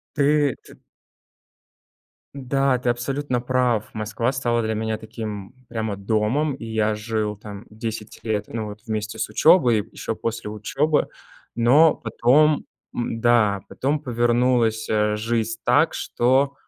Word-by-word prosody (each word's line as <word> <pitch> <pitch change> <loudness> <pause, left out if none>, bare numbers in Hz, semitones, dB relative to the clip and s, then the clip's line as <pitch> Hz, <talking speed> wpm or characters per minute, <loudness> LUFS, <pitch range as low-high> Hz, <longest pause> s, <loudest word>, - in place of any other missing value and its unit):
Ты 145 -2 +3
т - - -15 1.6
Да, 135 -1 +1
ты 125 - -3
абсолютно 125 +2 -1
прав. 125 -3 0
Москва 110 +3 -2
стала 120 -3 0
для 110 0 -1
меня 110 0 -2
таким 110 -1 -7
прямо 110 -3 -3
домом, 110 +9 0
и 130 - -9
я 110 -1 0
жил 105 -1 -2
там 105 +1 -10
10 110 -1 -6
лет, 105 -2 -1
ну 110 -1 -4
вот, 105 0 -9
вместе 110 0 -3
с - - -1
учёбой, 125 - +4
еще - - -4
после 115 -2 -4
учёбы. 140 +9 0 0.5
Но 140 +7 +5
потом, 140 +7 +2 0.3
м, 115 -1 -3
да, 110 -5 +3
потом 145 +3 -1
повернулась, 120 -3 +1
э, 105 -1 +1
жизнь 115 +1 -1
так, 145 +6 +3
что, 135 +3 +1
115 Hz, 135 wpm, -23 LUFS, 110-130 Hz, 1.6 s, Но